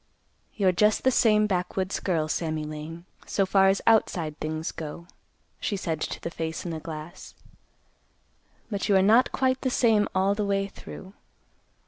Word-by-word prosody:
"You're 195 -3 +3
just 210 +4 +2
the 260 - +4
same 215 -3 +4
backwoods 185 0 -1
girl, 165 -5 0
Sammy 155 -1 -2
Lane, 155 +3 -7 0.2
so 195 - +1
far 195 0 +4
as 195 +1 +2
outside 175 -8 +2
things 155 +1 -3
go," 160 +2 -7 0.5
she 205 - -2
said 160 -5 -3
to - - -3
the 170 - -5
face 160 0 -4
in 175 - -3
the 160 - -4
glass; 155 +1 -9 1.4
"but 200 0 -2
you 200 - +5
are 190 - +5
not 225 +6 +5
quite 260 0 +1
the 260 - 0
same 225 -4 +3
all 190 +1 +3
the 210 +1 -2
way 200 -1 0
through. 190 0 -11
190 Hz, 165 wpm, -26 LUFS, 160-210 Hz, 1.4 s, you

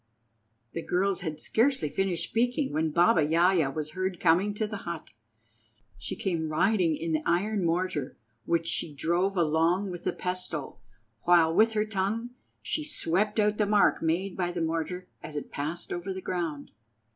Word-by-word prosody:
The 165 - -4
girls 185 +2 0
had 155 -3 -4
scarcely 250 - +2
finished 180 +3 0
speaking 245 - 0
when 160 +1 +1
Baba 170 +1 +4
Yaja 165 -1 +3
was 155 +1 -4
heard 185 +1 -3
coming 195 +5 +3
to 215 - 0
the 210 -1 -5
hut. 170 -4 -7 0.8
She 110 +3 -4
came 165 -5 -2
riding 175 0 +2
in 165 0 -3
the 155 - +1
iron 195 +5 +1
mortar, 170 -4 -1 0.3
which 170 -1 +1
she 165 - -1
drove 175 +6 0
along 170 +4 +2
with 175 - -7
the - - +2
pestle, 180 -8 -3 0.4
while, 170 -2 +4
with 220 +5 +4
her 210 0 +1
tongue, 215 +3 -2 0.3
she 310 - -1
swept 210 - 0
out 210 0 +2
the 210 - +3
mark 205 0 +4
made 175 +4 0
by 175 -2 -1
the 175 - -4
mortar 165 +3 -2
as 150 - -8
it 145 - -5
passed 155 +5 -4
over 175 +2 -4
the 190 - -4
ground. 165 -6 -3
175 Hz, 170 wpm, -28 LUFS, 160-200 Hz, 0.8 s, Baba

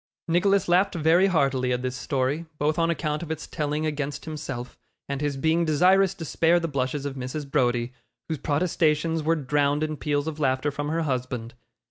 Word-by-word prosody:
Nicholas 190 +4 +2
laughed 180 +3 +3
very 170 +4 +4
heartily 135 -8 +1
at 125 0 -1
this 130 0 -2
story, 140 +4 -1
both 150 +2 0
on 165 0 +2
account 155 -2 -1
of 170 - -6
its 160 -1 -4
telling 150 +1 -2
against 145 -2 -3
himself, 145 -6 -6 0.3
and 140 0 -3
his 145 -2 -1
being 160 +4 +2
desirous 185 +5 +4
to 170 -4 -6
spare 165 +3 +3
the 165 - -2
blushes 140 -1 -2
of 140 - -3
Mrs. 135 +3 -5
Browdie, 125 -3 +1 0.3
whose 160 -3 -3
protestations 160 +1 +1
were 160 +2 +2
drowned 145 0 +1
in 155 -1 -2
peals 145 +1 -1
of 160 -1 -5
laughter 130 0 +1
from 145 +1 -3
her 165 +1 0
husband. 125 -4 -3
150 Hz, 185 wpm, -25 LUFS, 135-165 Hz, 0.3 s, very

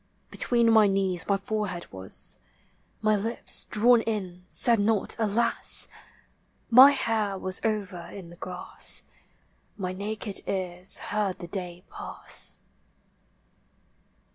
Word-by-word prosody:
Between 235 -2 +3
my 220 -2 +6
knees 190 -3 0
my 200 - +2
forehead 200 -3 -4
was, 95 0 -4 0.6
My 215 0 +3
lips, 225 +3 +2
drawn 235 +2 +4
in, 185 -5 -4
said 235 -2 +2
not 210 0 +1
Alas! 225 +2 +2 0.8
My 260 +4 +10
hair 220 -7 -1
was 185 0 0
over 200 -5 -3
in 180 -4 -10
the - - -12
grass, 180 +1 -4 0.7
My 185 -2 -4
naked 205 +1 -2
cars 185 -1 -1 0.2
heard 205 -3 -1
the 175 - -8
day 180 -1 -5
pass. - - -3
200 Hz, 115 wpm, -26 LUFS, 185-220 Hz, 0.8 s, My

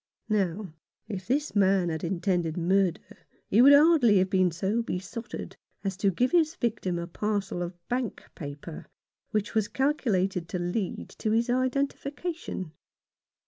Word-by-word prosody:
Now, 195 -3 -1 0.3
if 190 -3 -6
this 290 +3 0
man 190 -3 +3
had 160 -1 -3
intended 175 -2 0
murder 180 0 +2 0.5
he 220 - +6
would 275 +3 +9
hardly 285 -8 +6
have 185 +1 +2
been 185 -2 +4
so 195 +7 -1
besotted 225 +2 -6 0.3
as 195 -2 -2
to 200 +1 +2
give 245 +8 +1
his 325 -3 +3
victim 205 -7 -1
a 170 - -3
parcel 195 0 -2
of 175 0 -5
bank 245 -3 -2
paper, 145 +1 -8 0.4
which 210 -1 -1
was 220 -2 +1
calculated 195 - 0
to - - -2
lead 175 +3 -3
to 215 - -1
his 230 +3 +2
identification. 275 - -2
200 Hz, 140 wpm, -28 LUFS, 180-240 Hz, 0.5 s, would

